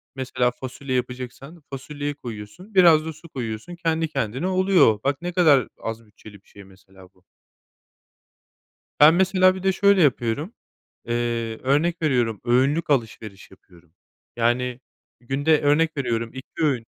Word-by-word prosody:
mesela, 125 -2 -1
fasulye 130 +2 -6
yapacaksan 125 +5 -6
fasulyeyi 145 +2 -5
koyuyorsun, 120 - -10
biraz 165 -4 +6
da 160 - -5
su 165 +2 -16
koyuyorsun 120 +5 -6
kendi 165 -2 -1
kendine 135 - -3
oluyor. 185 - +3
Bak, 140 +2 -1
ne 175 0 -4
kadar 150 - +4
az 115 0 -6
bütçeli 105 0 -16
bir - - -34
şey, 100 - -14
mesela, 95 -1 -19
bu. 90 - -31 1.8
Ben, 150 +2 +8
mesela, 185 +1 +3
bir 190 - -8
de 190 - +3
şöyle 200 0 +3
yapıyorum, 140 - 0 0.5
eee, 120 -1 -2
örnek 155 +6 +1
veriyorum, 120 -8 0
öğünlük 135 +7 +1
alışveriş 110 -6 -3
yapıyorum, 85 -3 -21 0.4
yani, 120 +1 0 0.4
günde, 145 +5 +1
örnek 150 +2 +2
veriyorum, 115 -4 -2
2 130 0 -11
öğün 125 -6 0
130 Hz, 140 wpm, -23 LUFS, 115-160 Hz, 1.8 s, Ben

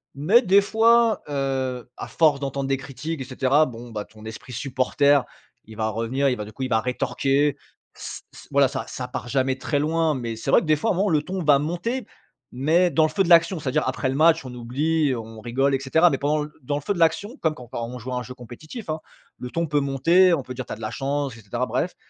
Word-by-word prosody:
mais 185 - +4
des 200 -3 +5
fois, 225 +2 +3
heu, 130 -3 -2
à - - -6
force 150 -4 +3
d'entendre 140 -1 -3
des 135 - +1
critiques 135 +4 -6
et - - -4
cetera, 135 +4 +2
bon, 120 -1 -9
bah, 105 -2 -5
ton 110 0 -17
esprit 125 +3 -9
supporter, 140 +2 +2 0.4
il 110 - -12
va 110 0 0
revenir, 120 +6 0
il 125 - -1
va 105 - -5
du 110 - -12
coup, 135 - -5
il 130 - -2
va 110 -2 +3
rétorquer, 135 +3 0 0.4
s - - -8
s - - -14
voilà, 140 -1 +4
ça 115 - -4
ça 125 -1 -6
part 125 - -5
jamais 130 +1 0
très 145 +2 -1
loin 160 0 +1
mais 115 -3 -4
c'est - - -5
vrai - - +6
que - - -6
des 155 - +4
fois, 225 +9 0
à - - +2
un - - -4
moment 200 +1 +2
le 150 -2 +2
ton 185 -1 -4
va 145 -2 +5
monter 175 - -3 0.5
mais 160 +8 +3
dans 160 - +3
le 155 - +3
feu 195 +5 +1
de - - -3
l'action, 170 +1 +5
c'est 145 - -8
à - - -1
dire - - +2
après 130 +1 -1
le 135 - -2
match, 160 -1 +4
on 125 - -7
oublie 145 +6 0
et 130 - 0
on 110 -1 -9
rigole 135 +4 +1
et 135 - -1
cetera, 160 +6 +4
mais 135 - -1
pendant 150 +2 0
l - - -11
dans 145 +3 -2
le 145 - -4
feu 205 - -1
de 175 - -6
l'action 185 - +1
comme 160 -1 +1
quand 125 -3 -11
quand 120 -1 -4
on 125 +1 -7
joue 125 +3 -6
à - - -1
un 125 - -3
jeu 125 - -9
compétitif, 155 - -10
hein, 155 0 -2 0.4
le 125 - -6
ton 170 +3 -2
peut 145 -1 +1
monter, 165 +7 +4
on 145 -6 0
peut 125 - -7
dire: 125 -1 -6
«Tu - - -9
as - - -7
de 110 - -13
la 110 - -3
chance!» 140 -2 -2
et - - -13
cetera, 120 +5 -3
bref, 130 +10 -2
140 Hz, 270 wpm, -23 LUFS, 125-160 Hz, 0.5 s, vrai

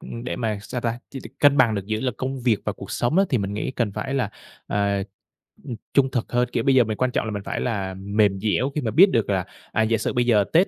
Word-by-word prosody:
ưm, 115 +1 -8
để - - -3
mà, 110 -4 -2
sao 125 - -5
ta, 115 0 -2
chi 135 - -7
được 115 - -9
cân 145 -1 +6
bằng 120 -5 +4
được 100 -1 -4
giữa 110 +4 -1
công 130 0 -3
việc 120 -4 +2
và - - -1
cuộc - - -10
sống 135 +10 +1
á, 195 - +5
thì 125 - +2
mình 100 0 -3
nghĩ 105 - -2
cần 120 -6 -1
phải 135 +5 -3
là, 125 -6 0 0.4
à, 100 0 0 0.8
ừm, 115 - -4 0.2
trung 135 -1 +3
thực 120 - -2
hơn. 125 0 +1
Kiểu, 115 - 0
bây 135 +1 +3
giờ 125 - +7
mình 110 -1 -3
quan 130 -1 +1
trọng - - -1
là 110 - -3
mình 100 -1 -4
phải - - -3
là 100 -5 -2
mềm 100 +1 +1
dẻo 110 +6 +1
khi 150 - 0
mà 110 - -2
biết 190 +6 +7
được 115 -4 +1
là, 95 -3 0 0.3
à, 110 - +1
giả 110 +1 +2
sử 110 - -2
bây 120 0 +1
giờ 110 -4 +4
Tết, 175 +4 +5
115 Hz, 285 wpm, -23 LUFS, 105-130 Hz, 0.8 s, giờ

